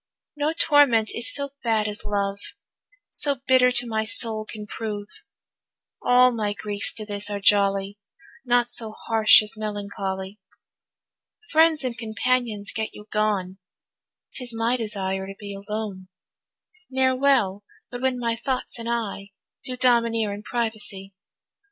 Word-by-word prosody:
No 295 Hz, +1 st, 0 dB
torment 285 Hz, -9 st, +4 dB
is 235 Hz, -, +3 dB
so 280 Hz, -1 st, -1 dB
bad 220 Hz, -3 st, +1 dB
as 210 Hz, 0 st, -4 dB
love, 200 Hz, -1 st, -2 dB, 0.7 s
So 285 Hz, -1 st, +1 dB
bitter 255 Hz, -1 st, +5 dB
to 245 Hz, 0 st, +3 dB
my 220 Hz, -2 st, -1 dB
soul 220 Hz, -1 st, +2 dB
can 210 Hz, -1 st, -7 dB
prove. 210 Hz, -1 st, -5 dB, 1.0 s
All 250 Hz, 0 st, +5 dB
my 215 Hz, -3 st, -2 dB
griefs 205 Hz, 0 st, -1 dB
to 215 Hz, -, -3 dB
this 205 Hz, 0 st, -1 dB
are 205 Hz, -1 st, -3 dB
jolly, 200 Hz, 0 st, +2 dB, 0.4 s
Naught 245 Hz, -1 st, +2 dB
so 225 Hz, -3 st, -2 dB
harsh 220 Hz, -1 st, +5 dB
as 210 Hz, -, -3 dB
melancholy. 200 Hz, -2 st, -5 dB, 1.1 s
Friends 320 Hz, -1 st, +4 dB
and 250 Hz, -2 st, -2 dB
companions 225 Hz, -1 st, -1 dB
get 220 Hz, -1 st, -4 dB
you 210 Hz, -, -11 dB
gone, 200 Hz, -3 st, -1 dB, 0.7 s
'Tis 245 Hz, -2 st, -2 dB
my 230 Hz, +2 st, +1 dB
desire 195 Hz, -4 st, -2 dB
to 195 Hz, -, -8 dB
be 200 Hz, -1 st, -7 dB
alone; 200 Hz, -1 st, -6 dB, 0.8 s
Ne'er 260 Hz, 0 st, +2 dB
well 250 Hz, -8 st, +2 dB, 0.3 s
but 245 Hz, -1 st, -6 dB
when 260 Hz, -1 st, +1 dB
my 235 Hz, -1 st, -1 dB
thoughts 255 Hz, 0 st, -3 dB
and 230 Hz, 0 st, -5 dB
I 215 Hz, -4 st, -3 dB, 0.3 s
Do 255 Hz, -2 st, -5 dB
domineer 230 Hz, -4 st, +2 dB
in 205 Hz, -, -7 dB
privacy. 215 Hz, -4 st, -3 dB
220 Hz, 140 wpm, -24 LUFS, 205-245 Hz, 1.1 s, bitter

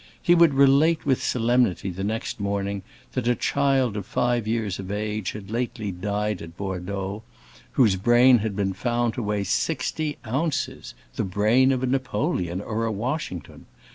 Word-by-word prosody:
He 175 Hz, -, +4 dB
would 170 Hz, -5 st, +5 dB
relate 140 Hz, +4 st, +4 dB
with 135 Hz, -3 st, +2 dB
solemnity 120 Hz, -5 st, +1 dB
the 95 Hz, +2 st, -5 dB
next 110 Hz, +2 st, -3 dB
morning 100 Hz, 0 st, -2 dB, 0.3 s
that 125 Hz, -2 st, -2 dB
a 120 Hz, -, +3 dB
child 135 Hz, -5 st, +1 dB
of 100 Hz, -2 st, -5 dB
five 120 Hz, -3 st, 0 dB
years 110 Hz, -4 st, -1 dB
of 95 Hz, -1 st, -6 dB
age 105 Hz, -1 st, -2 dB
had 105 Hz, -1 st, -9 dB
lately 115 Hz, -3 st, -2 dB
died 105 Hz, +2 st, -2 dB
at 85 Hz, +1 st, -10 dB
Bordeaux, 95 Hz, +1 st, -4 dB, 0.5 s
whose 110 Hz, -8 st, +4 dB
brain 120 Hz, +4 st, +5 dB
had 105 Hz, -1 st, -3 dB
been 95 Hz, -1 st, 0 dB
found 120 Hz, +3 st, 0 dB
to 125 Hz, -, -4 dB
weigh 105 Hz, -2 st, -1 dB
sixty 150 Hz, -, -1 dB
ounces—the 125 Hz, -, -3 dB
brain 110 Hz, +8 st, +3 dB
of 130 Hz, -1 st, -1 dB
a -, -, +3 dB
Napoleon 130 Hz, -, -1 dB
or 110 Hz, +2 st, -2 dB
a 115 Hz, -, -1 dB
Washington! 110 Hz, -, -4 dB
110 Hz, 160 wpm, -24 LUFS, 100-130 Hz, 0.5 s, would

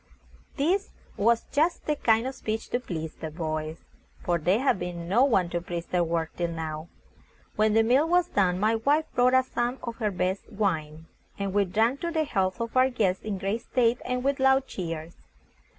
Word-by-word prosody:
This 370 Hz, +8 st, +1 dB, 0.3 s
was 230 Hz, +3 st, +2 dB
just 320 Hz, +4 st, +1 dB
the 300 Hz, -, +1 dB
kind 225 Hz, -4 st, +2 dB
of 265 Hz, -, -3 dB
speech 220 Hz, -3 st, -4 dB
to 245 Hz, -, 0 dB
please 160 Hz, -9 st, -5 dB
the 160 Hz, -, -6 dB
boys, 155 Hz, 0 st, -4 dB, 0.4 s
for 175 Hz, -1 st, 0 dB
there 180 Hz, +7 st, +2 dB
had 270 Hz, -8 st, +2 dB
been 175 Hz, -1 st, -5 dB
no 220 Hz, +8 st, +4 dB
one 205 Hz, -10 st, +3 dB
to 175 Hz, -, -1 dB
praise 175 Hz, -1 st, -5 dB
their 180 Hz, -1 st, +1 dB
work 165 Hz, -1 st, -2 dB
till 175 Hz, -, -1 dB
now. 160 Hz, -1 st, -5 dB, 0.7 s
When 215 Hz, 0 st, +2 dB
the 225 Hz, -, +5 dB
meal 265 Hz, +8 st, +3 dB
was 355 Hz, 0 st, +3 dB
done, 185 Hz, -, +1 dB
my 215 Hz, +3 st, +2 dB
wife 290 Hz, +7 st, +2 dB
brought 250 Hz, +1 st, +4 dB
out 260 Hz, 0 st, +4 dB
some 245 Hz, 0 st, -2 dB
of 235 Hz, -1 st, -5 dB
her 215 Hz, -3 st, 0 dB
best 185 Hz, +2 st, -2 dB
wine, 160 Hz, -7 st, -2 dB, 0.3 s
and 200 Hz, -1 st, -3 dB
we 205 Hz, 0 st, +3 dB
drank 225 Hz, +8 st, +1 dB
to 340 Hz, -, -1 dB
the 320 Hz, -2 st, 0 dB
health 190 Hz, -8 st, -1 dB
of 230 Hz, +1 st, -4 dB
our 255 Hz, +1 st, +5 dB
guest 200 Hz, -7 st, 0 dB
in 210 Hz, -2 st, -3 dB
great 195 Hz, +4 st, -2 dB
state, 240 Hz, -1 st, +1 dB
and 250 Hz, 0 st, -2 dB
with 275 Hz, +1 st, 0 dB
loud 265 Hz, 0 st, +4 dB
cheers. 165 Hz, -6 st, -6 dB
215 Hz, 200 wpm, -27 LUFS, 175-255 Hz, 0.7 s, the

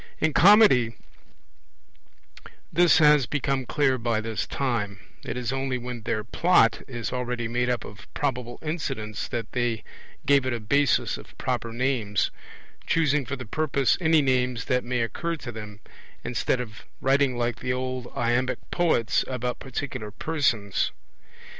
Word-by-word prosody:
In 160 Hz, -1 st, +1 dB
Comedy 185 Hz, -, +6 dB, 1.8 s
this 175 Hz, -1 st, +5 dB
has 150 Hz, -5 st, +5 dB
become 135 Hz, -2 st, -1 dB
clear 135 Hz, -4 st, +2 dB
by 115 Hz, -2 st, 0 dB
this 110 Hz, -1 st, -3 dB
time; 115 Hz, -7 st, -2 dB, 0.3 s
it -, -, -4 dB
is 125 Hz, 0 st, -2 dB
only 135 Hz, -1 st, -1 dB
when 125 Hz, -1 st, -6 dB
their 110 Hz, -1 st, -2 dB
plot 120 Hz, -1 st, +3 dB
is 120 Hz, -1 st, -4 dB
already 125 Hz, -2 st, -2 dB
made 125 Hz, +1 st, 0 dB
up 125 Hz, -3 st, -1 dB
of 100 Hz, -1 st, -12 dB
probable 125 Hz, -4 st, -2 dB
incidents 135 Hz, -, -3 dB
that 115 Hz, -2 st, -4 dB
they 120 Hz, -3 st, -1 dB, 0.4 s
give 140 Hz, -2 st, +4 dB
it 130 Hz, -, 0 dB
a 120 Hz, -, -2 dB
basis 140 Hz, +6 st, +1 dB
of -, -, -15 dB
proper 120 Hz, -2 st, -2 dB
names, 120 Hz, -4 st, 0 dB, 0.6 s
choosing 150 Hz, -5 st, +2 dB
for 140 Hz, -, -2 dB
the 125 Hz, -1 st, -8 dB
purpose 140 Hz, +1 st, +1 dB
any 160 Hz, -2 st, +4 dB
names 125 Hz, -3 st, +1 dB
that 125 Hz, 0 st, +1 dB
may 125 Hz, 0 st, -1 dB
occur 165 Hz, +9 st, -2 dB
to 130 Hz, -6 st, -7 dB
them, 105 Hz, -2 st, -9 dB, 0.4 s
instead 125 Hz, -, 0 dB
of 120 Hz, -1 st, -7 dB, 0.2 s
writing 135 Hz, -1 st, +2 dB
like 120 Hz, -1 st, -1 dB
the 125 Hz, -, -2 dB
old 130 Hz, -1 st, -3 dB
iambic 120 Hz, +1 st, +1 dB
poets 160 Hz, -10 st, +2 dB
about 125 Hz, -1 st, -3 dB
particular 130 Hz, -4 st, -5 dB
persons. 115 Hz, -7 st, 0 dB
125 Hz, 145 wpm, -26 LUFS, 115-140 Hz, 1.8 s, Comedy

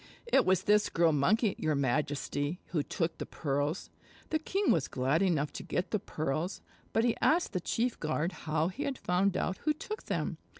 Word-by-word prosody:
"It 470 Hz, -, +3 dB
was 185 Hz, -1 st, +3 dB
this 210 Hz, 0 st, +4 dB
Girl 165 Hz, -1 st, +3 dB
Monkey, 195 Hz, -, +3 dB
your 155 Hz, -1 st, +1 dB
Majesty, 145 Hz, +3 st, -1 dB
who 160 Hz, -, +1 dB
took 165 Hz, +3 st, -2 dB
the -, -, -3 dB
pearls." 145 Hz, +3 st, -2 dB, 0.4 s
The 315 Hz, -, +2 dB
king 390 Hz, +6 st, +1 dB
was 160 Hz, -5 st, +2 dB
glad 135 Hz, +6 st, +1 dB
enough 160 Hz, -6 st, +1 dB
to -, -, -5 dB
get 180 Hz, -, -2 dB
the 215 Hz, -, +1 dB
pearls, 155 Hz, +3 st, -2 dB, 0.3 s
but 225 Hz, -, +2 dB
he 240 Hz, -1 st, +2 dB
asked 335 Hz, -3 st, +3 dB
the 185 Hz, -, 0 dB
chief 235 Hz, +7 st, -1 dB
guard 155 Hz, +2 st, -1 dB, 0.2 s
how 155 Hz, +2 st, +2 dB
he 220 Hz, +10 st, -7 dB
had 275 Hz, -3 st, -2 dB
found 185 Hz, +2 st, +1 dB
out 185 Hz, -, -1 dB
who 305 Hz, -, +1 dB
took 425 Hz, +8 st, -6 dB
them. -, -, -2 dB
175 Hz, 195 wpm, -31 LUFS, 150-215 Hz, 0.4 s, this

